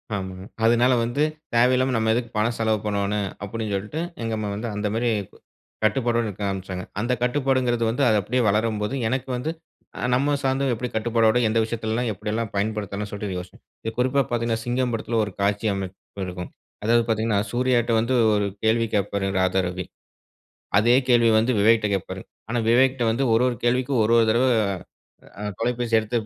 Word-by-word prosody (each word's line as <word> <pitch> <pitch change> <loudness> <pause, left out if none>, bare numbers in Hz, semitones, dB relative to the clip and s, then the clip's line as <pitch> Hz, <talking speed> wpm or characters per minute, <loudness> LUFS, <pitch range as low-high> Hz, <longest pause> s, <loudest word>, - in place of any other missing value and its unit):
ஆமாங்க. 95 -1 -5 0.2
அதுனால 120 +2 +4
வந்து, 120 +6 0 0.3
"தேவையில்லாம 130 +2 +3
நம்ம 110 0 +2
எதுக்கு 120 -1 -1
பணம் 115 +2 +1
செலவு 110 -1 +1
பண்ணுவோனு", 100 0 0 0.3
அப்டின் 110 +1 -4
சொல்லிட்டு 105 +12 -4 0.2
எங்க 115 0 -2
அம்மா 105 -1 -3
வந்து, 115 +3 -4
அந்த 105 0 -1
மாரி 120 +1 +1 0.7
கட்டுப்பாடோட 120 0 +2
இருக்க 100 0 -6
ஆரம்பிச்சாங்க. 95 -1 -4 0.2
அந்த 120 +3 0
கட்டுப்பாடுங்றது 125 -2 +1
வந்து 125 +5 0
அது 110 - +4
அப்படியே 125 +6 0
வளரும்போது, 105 +2 0
எனக்கு 130 +2 -2
வந்து, 150 +6 -3 0.5
அ - - -2
நம்ம 145 +3 +2
சார்ந்தவ 135 0 +1
எப்டி 125 +2 -4
கட்டுப்பாடோட 115 0 +2
எந்த 110 +1 0
விஷயத்துலலாம் 115 +1 -2
எப்டியெல்லாம் 110 +3 -3
பயன்படுத்தணும் 105 0 -2
சொல்ட்டு 100 -2 -4
யோசிச்சேன். 90 - -12 0.2
இது 110 - -3
குறிப்பா 130 +2 +3
பாத்தீங்கன்னா, 115 -1 0
சிங்கம் 125 0 0
படத்துல 115 0 -1
ஒரு 100 - -8
காட்சி 100 +2 +1
அமைப்பு 95 0 -6
இருக்கும். 90 0 -6 0.3
அதாவது 115 +2 +3
பாத்தீங்கன்னா, 110 -2 +1
சூர்யாட்ட 120 -1 +1
வந்து 125 +3 0 0.2
ஒரு 105 -1 +1 0.2
கேள்வி 115 +1 +2
கேட்பாரு 100 -1 0
ராதா 95 +1 +2
ரவி, 90 0 -4 0.9
அதே 120 +3 +4
கேள்விய 115 -2 +5
வந்து 115 +4 +1
விவேக்ட்ட 110 0 +4
கேட்பாரு. 95 - -5 0.3
ஆனா, 120 - -1
விவேக்ட்ட 130 +1 +3
வந்து 130 +4 0
ஒரு 115 +3 +4
ஒரு 120 - -3
கேள்விக்கும் 125 0 +2
ஒரு 115 - +2
ஒரு 115 - +5
தடவ, 120 +4 +3 0.9
அ 105 - -5 0.2
தொலைபேசி 120 0 -1
எடுத்து, 110 +2 -2
115 Hz, 165 wpm, -24 LUFS, 105-125 Hz, 0.9 s, கேள்விய